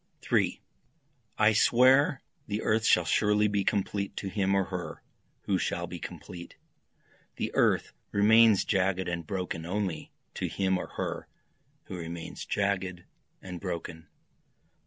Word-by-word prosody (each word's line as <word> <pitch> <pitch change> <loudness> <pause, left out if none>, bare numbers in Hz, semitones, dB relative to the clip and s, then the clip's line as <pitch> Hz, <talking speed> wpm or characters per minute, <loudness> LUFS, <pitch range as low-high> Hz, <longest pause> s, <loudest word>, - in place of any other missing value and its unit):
3 - - +1 0.8
I 110 0 +5
swear 130 +5 +4 0.2
the 105 +1 -3
earth 110 +1 +1
shall 90 - +4
surely 105 +5 +3
be 100 -1 0
complete 100 0 -1
to 100 - -3
him 100 -1 +1
or 95 - +3
her 90 -4 -6 0.4
who 95 -2 0
shall 85 - -2
be 90 0 -7
complete, 85 +2 -9 0.8
The - - -3
earth - - +2 0.2
remains 110 0 +5
jagged 95 -1 +1
and 85 -2 -4
broken 90 -4 -3
only 95 0 -3 0.2
to - - -3
him 95 -1 0
or - - -5
her - - -3 0.6
who 95 - -8
remains 85 0 -7
jagged 95 -3 -1 0.4
and 90 -2 -7
broken. 85 -3 -5
95 Hz, 135 wpm, -29 LUFS, 90-105 Hz, 0.8 s, I